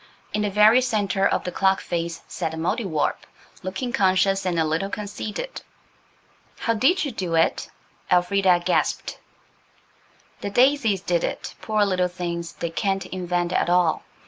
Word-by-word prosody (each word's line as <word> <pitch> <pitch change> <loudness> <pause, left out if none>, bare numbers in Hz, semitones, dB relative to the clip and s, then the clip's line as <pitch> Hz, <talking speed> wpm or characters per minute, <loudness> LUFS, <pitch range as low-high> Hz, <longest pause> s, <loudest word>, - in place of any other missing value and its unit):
In 210 - 0
the 210 - 0
very 210 +5 +6
centre 205 -5 +1
of - - 0
the 180 - -4
clock 190 +1 +2
face 170 -1 -4
sat 160 - -4
the - - -6
Mouldiwarp, 165 -1 -1 0.4
looking 195 +7 -4
conscious 195 0 +2
and 175 -2 0
a 160 - +2
little 160 +5 -1
conceited. 210 - -5 1.0
"How 230 - 0
did 300 - +2
you 280 - -3
do 180 -7 -3
it?" 165 - +1 0.4
Elfrida 180 0 +3
gasped. - - 0 1.2
"The - - -4
daisies 240 -4 +3
did 175 -3 0
it. - - -4
Poor 215 -1 +1
little 185 -2 +1
things! 170 -1 -5
They 170 - -4
can't 195 +2 -1
invent 175 -1 -2
at - - +1
all. 175 -2 +3
190 Hz, 150 wpm, -24 LUFS, 175-210 Hz, 1.2 s, very